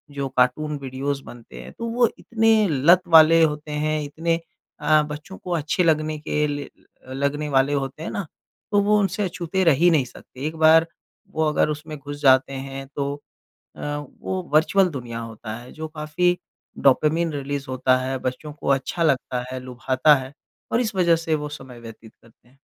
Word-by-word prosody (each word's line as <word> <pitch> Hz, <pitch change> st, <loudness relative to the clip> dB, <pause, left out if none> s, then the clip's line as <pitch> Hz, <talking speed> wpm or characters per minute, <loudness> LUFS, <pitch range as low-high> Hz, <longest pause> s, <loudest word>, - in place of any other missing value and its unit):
जो 140 Hz, -1 st, -2 dB
cartoon 145 Hz, +4 st, +1 dB
videos 135 Hz, +1 st, -3 dB
बनते 120 Hz, -1 st, -11 dB
हैं -, -, -10 dB
तो 230 Hz, -, -4 dB
वो 240 Hz, +1 st, +3 dB
इतने 225 Hz, -1 st, +2 dB
लत 165 Hz, +5 st, +5 dB, 0.2 s
वाले 165 Hz, +1 st, +7 dB
होते 150 Hz, -1 st, -1 dB
हैं 155 Hz, 0 st, 0 dB
इतने 165 Hz, +3 st, -1 dB, 0.4 s
अ, 155 Hz, +1 st, +4 dB
बच्चों 150 Hz, +6 st, -8 dB
को 180 Hz, -, -8 dB
अच्छे 160 Hz, +3 st, 0 dB
लगने 155 Hz, -2 st, +1 dB
के 150 Hz, 0 st, -1 dB
लिए 145 Hz, -1 st, -4 dB
ल 130 Hz, -, -19 dB
अ, -, -, -4 dB
लगने 140 Hz, +2 st, -1 dB
वाले 135 Hz, +1 st, +2 dB
होते 140 Hz, +2 st, -3 dB
हैं -, -, -4 dB
ना 200 Hz, -, -3 dB, 0.5 s
तो 205 Hz, -1 st, +4 dB
वो 210 Hz, +1 st, +3 dB
उनसे 200 Hz, +1 st, 0 dB
अछूते 180 Hz, 0 st, -2 dB
रह 165 Hz, -4 st, +5 dB
ही 175 Hz, -, +7 dB
नहीं 150 Hz, -6 st, +3 dB
सकते। 130 Hz, +2 st, -10 dB
एक 155 Hz, -, -5 dB
बार 165 Hz, +1 st, +6 dB, 0.4 s
वो 160 Hz, -, 0 dB
अगर 150 Hz, -, +2 dB
उसमें 150 Hz, +1 st, -5 dB
घुस 145 Hz, +1 st, -8 dB
जाते 130 Hz, -1 st, +4 dB
हैं 135 Hz, 0 st, -6 dB
तो 140 Hz, 0 st, -1 dB, 0.6 s
अ, -, -, -9 dB, 0.4 s
वो 185 Hz, 0 st, -2 dB
वर्चुअल 185 Hz, +5 st, +4 dB
दुनिया 120 Hz, -6 st, -6 dB
होता 115 Hz, -1 st, -7 dB
है 120 Hz, +1 st, -12 dB
जो 160 Hz, 0 st, -6 dB
काफ़ी 155 Hz, +3 st, 0 dB, 0.4 s
डोपामाइन 155 Hz, +5 st, +3 dB
रिलीज़ 140 Hz, 0 st, -4 dB
होता 130 Hz, 0 st, +2 dB
है। 130 Hz, +1 st, -2 dB
बच्चों 130 Hz, +4 st, -4 dB
को 150 Hz, -, -9 dB
अच्छा 140 Hz, +5 st, 0 dB
लगता 130 Hz, -4 st, 0 dB
है, 130 Hz, -, -4 dB
लुभाता 130 Hz, +3 st, +2 dB
है 130 Hz, 0 st, -6 dB, 0.4 s
और 235 Hz, -, +2 dB
इस 220 Hz, -4 st, -3 dB
वजह 170 Hz, -3 st, +4 dB
से 160 Hz, -, +2 dB
वो 150 Hz, -1 st, -4 dB
समय 130 Hz, -4 st, -10 dB
व्यतीत 115 Hz, -1 st, -12 dB
करते 115 Hz, +1 st, -24 dB
हैं। 135 Hz, -, -27 dB
150 Hz, 190 wpm, -23 LUFS, 135-165 Hz, 0.6 s, वाले